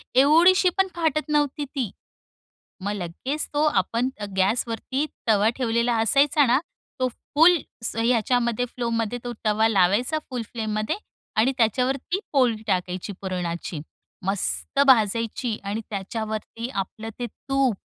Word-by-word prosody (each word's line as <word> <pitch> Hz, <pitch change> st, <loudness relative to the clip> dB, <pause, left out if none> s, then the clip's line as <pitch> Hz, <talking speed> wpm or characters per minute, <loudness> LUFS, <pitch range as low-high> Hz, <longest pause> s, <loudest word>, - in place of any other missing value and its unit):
एवढीशी 335 Hz, +7 st, +6 dB
पण 385 Hz, 0 st, +3 dB
फाटत 315 Hz, -2 st, 0 dB
नव्हती 295 Hz, -1 st, +1 dB
ती. 260 Hz, -7 st, -3 dB, 0.9 s
मग 205 Hz, -, -1 dB
लगेच 205 Hz, -, -3 dB
तो 295 Hz, +1 st, +2 dB
आपण 230 Hz, 0 st, +1 dB
अ, -, -, -2 dB
गॅसवरती 230 Hz, +8 st, 0 dB, 0.2 s
तवा 210 Hz, 0 st, +4 dB
ठेवलेला 235 Hz, -1 st, +1 dB
असायचा 275 Hz, +5 st, +4 dB
ना? 245 Hz, +3 st, +4 dB, 0.4 s
तो 255 Hz, -, +3 dB
फुल 325 Hz, +8 st, +4 dB, 0.3 s
स -, -, -3 dB
ह्याच्यामध्ये 235 Hz, 0 st, +1 dB
फ्लोमध्ये 235 Hz, -1 st, -2 dB
तो 245 Hz, -, -3 dB
तवा 215 Hz, +1 st, +3 dB
लावायचा, 210 Hz, -, +2 dB
फुल 250 Hz, -3 st, -3 dB
फ्लेममध्ये 215 Hz, -, -2 dB, 0.4 s
आणि 240 Hz, +5 st, +4 dB
त्याच्यावरती 260 Hz, -, +1 dB
पोळी 240 Hz, -6 st, +2 dB
टाकायची 185 Hz, 0 st, -2 dB
पुरणाची. 175 Hz, -4 st, -4 dB, 0.5 s
मस्त 200 Hz, +7 st, 0 dB
भाजायची 230 Hz, -1 st, +2 dB
आणि 205 Hz, +3 st, -2 dB
त्याच्यावरती 220 Hz, +3 st, -4 dB
आपलं 215 Hz, +2 st, -4 dB
ते 245 Hz, -, -2 dB
तूप. 270 Hz, -1 st, -1 dB
235 Hz, 125 wpm, -24 LUFS, 215-270 Hz, 0.9 s, एवढीशी